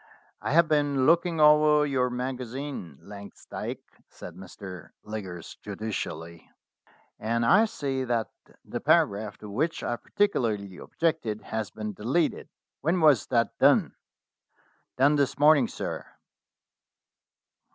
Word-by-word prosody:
"I - - -2
have 170 +1 +5
been 145 -3 +2
looking 170 +1 +3
over 150 0 +6
your 130 -3 +1
magazine, 125 - -5
Langs 100 0 -11
dyke," - - -6 0.2
said 85 - -10
Mr. 95 0 -10
Liggers 95 -6 -7
judicially, 90 -6 -6 0.7
"and 115 +2 0
I 210 - +6
see 135 -10 -3
that 115 -2 -1 0.3
the - - -5
paragraph 100 0 +2
to 105 - -10
which 155 +10 -1
I - - -1
particularly 110 - -1
objected 160 -11 -2
has 110 -1 -4
been 105 -1 -6
deleted. 130 - -1 0.3
When 165 +5 +1
was 145 - +4
that 115 -2 +1
done?" - - +4 1.0
"Done 140 +3 +4
this 140 -2 0
morning, 145 -3 +5
sir." - - -5
125 Hz, 120 wpm, -27 LUFS, 105-150 Hz, 1.0 s, over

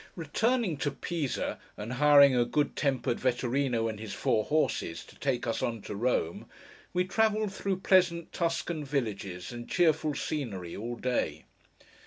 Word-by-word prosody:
Returning 200 - 0
to 145 - 0
Pisa, 150 -1 -3 0.2
and 105 +4 -5
hiring 140 0 +7
a 120 - +4
good 145 +4 0
tempered 135 -4 0
Vetturíno, 125 -1 +1
and 110 -2 -4
his 110 -2 -6
four 110 +2 +1
horses, 150 - 0
to - - -16
take 130 -3 -1
us 115 - -1
on 115 -3 -2
to - - -6
Rome, 105 -7 -1 0.4
we 180 0 +1
travelled 215 +1 +1
through 195 -2 -2
pleasant 180 -3 +3
Tuscan 165 -2 -1
villages 105 -10 -3
and 120 0 -8
cheerful 155 -4 +2
scenery 100 - -4
all 120 +3 -4
day. 125 +1 -1
140 Hz, 150 wpm, -29 LUFS, 120-170 Hz, 0.4 s, hiring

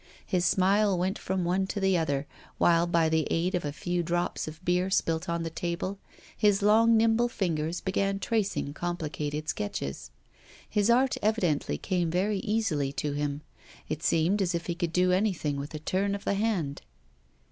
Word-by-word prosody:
His 180 -1 0
smile 195 +2 +3
went 185 +3 -1
from 185 -1 -2
one 190 +2 +1
to 205 - -3
the 190 -1 +2
other, 145 -4 0 0.3
while, 170 0 +4
by 170 -2 +3
the 160 -1 +1
aid 175 +3 0
of 180 - 0
a 145 - -2
few 175 +4 -2
drops 175 0 -1
of 155 +3 -9
beer 180 +1 +2
spilt 165 -1 0
on 170 0 -1
the 165 - -4
table, 175 +4 -3 0.4
his 205 -1 +2
long 225 +2 +5
nimble 230 +2 +3
fingers 165 -5 -2
began 195 +1 0
tracing 200 -9 -1
complicated 155 -3 -3
sketches. 70 - -4 0.6
His 210 +1 +1
art 255 +2 +3
evidently 175 - +1
came 175 - -1
very 195 +4 0
easily 190 -11 0
to 145 +1 -2
him; 145 0 -2 0.5
it 155 - -3
seemed 170 +6 +2
as 180 -2 0
if 170 - -3
he 170 - -1
could 170 -1 -2
do 180 +1 +3
anything 180 -7 0
with 140 +2 -6
a - - -2
turn 195 +5 0
of 200 - -7
the - - +1
hand. 195 -9 -1
180 Hz, 180 wpm, -28 LUFS, 160-200 Hz, 0.6 s, long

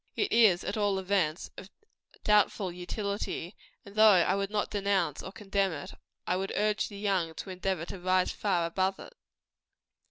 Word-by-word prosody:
It 410 - 0
is, 215 -6 +5
at 200 - -3
all 205 -2 +1
events, 185 -3 -1
of 195 - -11 0.5
doubtful 210 -2 +2
utility; 195 0 -4 0.3
and 200 - -12
though 215 +1 +4
I 185 -2 +4
would 195 0 -1
not 210 0 -2
denounce 200 -1 0
or 190 - -8
condemn 195 -2 -1
it, 145 -2 -7 0.3
I 180 - 0
would 195 +1 -3
urge 210 0 +1
the 205 - -10
young 190 -5 -1
to 190 - -7
endeavor 185 -2 -2
to 190 +1 -8
rise 185 0 +2
far 180 -5 0
above 190 +3 0
it. - - -11
195 Hz, 170 wpm, -29 LUFS, 180-205 Hz, 0.5 s, is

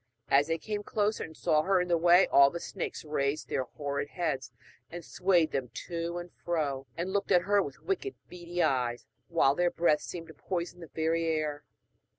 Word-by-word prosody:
As 140 +1 +4
they 165 0 0
came 210 +4 -4
closer 210 +1 0
and 160 -1 -10
saw 150 - +3
her 190 +3 +2
in 180 - 0
the 175 - +3
way, 175 +2 +6
all 140 0 +6
the 170 - -5
snakes - - -5
raised 150 0 -1
their 130 - -1
horrid 140 +2 -4
heads 150 -8 -2 0.4
and 170 -1 -8
swayed 180 -4 +2
them 130 -3 -2 0.2
to 170 0 -3
and 175 0 -7
fro, 145 -6 -1
and 180 +3 -2
looked 200 0 -1
at 180 -2 +5
her 205 +1 +3
with 140 -7 -7
wicked 390 +1 -2
beady 175 0 -3
eyes, 120 -2 0 0.2
while 160 -5 +3
their 175 +4 +2
breath 165 -3 +2
seemed 165 -2 -7
to - - -10
poison 175 +2 -4
the 165 - -9
very 165 +1 0
air. 155 -2 -1
165 Hz, 195 wpm, -30 LUFS, 145-175 Hz, 0.4 s, way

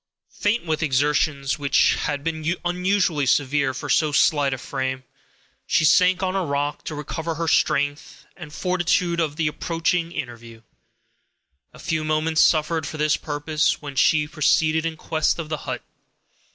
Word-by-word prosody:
Faint 210 0 -1
with 160 -1 -1
her - - +2
exertions, 140 0 0
which 140 -1 +3
had 145 -1 -3
been 160 +1 -2
unusually 180 -4 +1
severe 140 +1 +2
for 130 - -7
so 155 -2 +2
slight 145 -1 +3
a 135 - -2
frame, 130 +1 -4 0.6
she 160 - +2
sank 180 +4 +4
on 185 0 -1
a 190 - 0
rock, 145 -1 -2
to 155 - -5
recover 160 +3 -4
her 165 +1 -3
strength 145 -1 0
and 160 -5 -10
fortitude 180 0 0
for 165 - +2
the 155 +2 -2
approaching 165 +2 -1
interview. 115 -6 -8 1.1
A - - -16
few 160 -1 -2
moments 155 +1 +1
sufficed 160 -1 +2
for 155 - -7
this 150 0 +2
purpose, 155 +1 -1
when 145 -2 -8
she 150 +2 +3
proceeded 160 +1 +1
in 160 -1 -5
quest 155 -1 0
of 165 -3 -6
the 155 - -2
hut. - - -4
155 Hz, 160 wpm, -23 LUFS, 145-165 Hz, 1.1 s, sank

